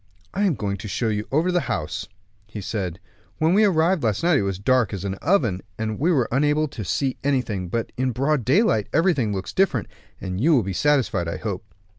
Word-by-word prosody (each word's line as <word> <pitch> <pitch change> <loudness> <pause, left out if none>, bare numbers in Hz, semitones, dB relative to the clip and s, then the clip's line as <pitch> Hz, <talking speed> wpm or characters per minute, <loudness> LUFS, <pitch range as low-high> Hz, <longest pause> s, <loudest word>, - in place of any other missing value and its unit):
"I 205 +2 +1
am 180 -7 +2
going 100 -3 -3
to 105 - -7
show 115 +3 -1
you 105 0 -2
over 160 +6 +2
the 180 - +2
house," 90 -9 -3 0.4
he 110 0 -7
said; 95 -4 -4 0.4
"when 160 +2 +2
we 210 +3 +5
arrived 175 -2 +2
last 110 +1 0
night 170 -4 +4
it - - +1
was 100 -1 -1
as - - -10
dark 125 -2 +2
as 95 0 -6
an 95 - -1
oven, 125 - +2 0.2
and 110 -1 -3
we 165 +6 +2
were 130 -8 +2
unable 150 +4 +2
to 110 - -6
see 130 +8 -1
anything; 120 -10 -1
but 115 +4 -2
in 130 +1 +1
broad 135 +2 0
daylight, 125 - +2
everything 160 - +2
looks 95 -1 -4
different, 185 - +1 0.3
and 95 0 -4
you 160 +3 +5
will 125 - +3
be 95 0 -3
satisfied, 120 - +1
I 85 - -3
hope." 105 -2 -4
120 Hz, 220 wpm, -23 LUFS, 100-155 Hz, 0.4 s, we